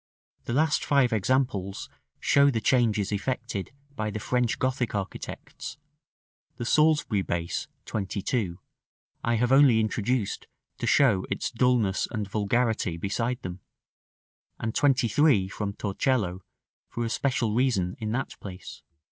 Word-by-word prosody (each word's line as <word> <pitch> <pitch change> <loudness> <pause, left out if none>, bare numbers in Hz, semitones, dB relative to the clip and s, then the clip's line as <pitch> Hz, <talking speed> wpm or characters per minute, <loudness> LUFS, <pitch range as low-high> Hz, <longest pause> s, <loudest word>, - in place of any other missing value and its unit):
The 120 - -3
last 150 +3 +2
five 135 -4 +3
examples 105 -3 0 0.3
show 140 0 +4
the 120 -5 0
changes 110 -4 +2
effected 115 -1 -3 0.2
by 110 -3 -2
the 105 - -4
French 125 +2 0
Gothic 130 -4 -1
architects: 100 +5 -6 0.8
the 120 - -4
Salisbury 150 -7 +3
base 85 -2 -3 0.2
(22) 100 -1 -2 0.7
I 115 - +1
have 120 +2 +1
only 135 -4 +6
introduced 110 0 -1 0.3
to - - -2
show 110 -10 +4
its 100 - -2
dulness 120 -5 +2
and 105 -2 -3
vulgarity 105 -3 0
beside 115 +7 -2
them; 90 0 -6 1.0
and 110 0 -2
23, 130 -4 +3
from 100 0 -4
Torcello, 100 -2 -1 0.5
for 120 - -3
a - - -1
special 125 -6 0
reason, 110 -8 +1
in 110 -1 -3
that 125 +4 -3
place. 95 -2 -9
115 Hz, 125 wpm, -27 LUFS, 100-130 Hz, 1.0 s, only